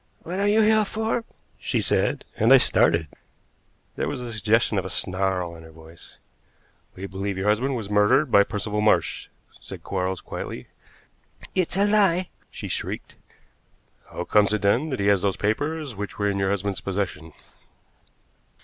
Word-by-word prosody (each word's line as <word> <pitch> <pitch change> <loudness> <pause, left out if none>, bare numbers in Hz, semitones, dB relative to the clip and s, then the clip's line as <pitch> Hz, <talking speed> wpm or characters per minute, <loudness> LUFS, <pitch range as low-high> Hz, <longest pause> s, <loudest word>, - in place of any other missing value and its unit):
"What 180 +3 -4
are 200 - +2
you 215 +2 +4
here 215 0 +4
for?" 220 +2 -2 0.3
she - - -1
said, - - 0
and - - +3
I - - +10
started. 85 -1 +3 0.9
There - - -2
was 145 - -3
the 120 -2 -6
suggestion 110 -1 +2
of 95 - -5
a - - -4
snarl 90 -1 -2
in 80 - -12
her 80 - -13
voice. 80 +1 -15 0.8
"We 95 - -6
believe 100 0 -4
your 95 +2 -2
husband 125 +6 +1
was 110 -4 -4
murdered 105 +7 +3
by 100 - +7
Percival 105 +1 -2
Marsh," 105 - +1 0.3
said - - -10
Quarles 95 -1 -2
quietly. 65 - -7 0.8
"It's 185 -1 0
a 200 - +4
lie!" 195 -4 +2 0.2
she - - -7
shrieked. - - -4 1.0
"How 90 - -5
comes 105 +2 +3
it, 105 - -1
then, 120 +10 +2
that 130 - -3
he 100 - 0
has 100 -2 +4
those 100 -1 0
papers 145 +5 -2
which 105 +1 -6
were 100 -1 +1
in 100 - -2
your 95 0 +1
husband's 100 0 -2
possession?" 90 -5 -4
105 Hz, 165 wpm, -24 LUFS, 95-145 Hz, 1.0 s, I